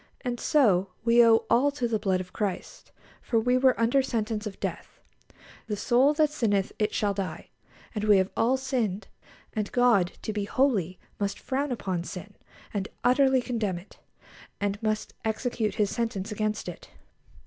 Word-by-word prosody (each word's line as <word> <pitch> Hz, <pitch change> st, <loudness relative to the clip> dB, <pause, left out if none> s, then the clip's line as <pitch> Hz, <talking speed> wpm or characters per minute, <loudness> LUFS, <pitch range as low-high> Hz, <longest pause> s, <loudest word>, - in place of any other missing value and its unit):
And 245 Hz, -1 st, -3 dB
so 200 Hz, -11 st, +3 dB, 0.2 s
we 235 Hz, 0 st, +6 dB
owe 225 Hz, -1 st, +5 dB
all 270 Hz, +4 st, +4 dB
to 255 Hz, -4 st, -1 dB
the 225 Hz, -2 st, 0 dB
blood 190 Hz, -3 st, +1 dB
of 180 Hz, 0 st, -11 dB
Christ, 205 Hz, -4 st, -4 dB, 0.3 s
for 230 Hz, -, +1 dB
we 245 Hz, +3 st, +2 dB
were 255 Hz, -1 st, +3 dB
under 235 Hz, +4 st, +3 dB
sentence 220 Hz, -4 st, -2 dB
of 200 Hz, -, -9 dB
death -, -, -5 dB, 0.7 s
"The 210 Hz, -, -2 dB
soul 260 Hz, +7 st, +3 dB
that 305 Hz, -1 st, +3 dB
sinneth 205 Hz, -9 st, 0 dB
it 210 Hz, 0 st, +1 dB
shall 205 Hz, -1 st, 0 dB
die"; 185 Hz, -5 st, -5 dB, 0.4 s
and 210 Hz, -2 st, -2 dB
we 210 Hz, -2 st, +6 dB
have 190 Hz, 0 st, +1 dB
all 245 Hz, +4 st, +2 dB
sinned, 245 Hz, -7 st, -2 dB, 0.4 s
and 210 Hz, -3 st, -2 dB
God, 235 Hz, -8 st, +3 dB
to 215 Hz, -, -3 dB
be 205 Hz, -1 st, -2 dB
holy, 205 Hz, -, +1 dB, 0.2 s
must 200 Hz, -1 st, -1 dB
frown 275 Hz, +1 st, -2 dB
upon 190 Hz, -7 st, -2 dB
sin, 195 Hz, +3 st, -8 dB, 0.4 s
and 200 Hz, -2 st, -2 dB, 0.2 s
utterly 260 Hz, +1 st, +4 dB
condemn 220 Hz, -8 st, -2 dB
it, 175 Hz, +4 st, -14 dB, 0.6 s
and 205 Hz, +1 st, -2 dB
must 215 Hz, -1 st, -2 dB
execute 220 Hz, 0 st, -1 dB
His 205 Hz, -2 st, +1 dB
sentence 225 Hz, -5 st, -2 dB
against 215 Hz, 0 st, -2 dB
it. -, -, -8 dB
220 Hz, 170 wpm, -27 LUFS, 200-245 Hz, 0.7 s, we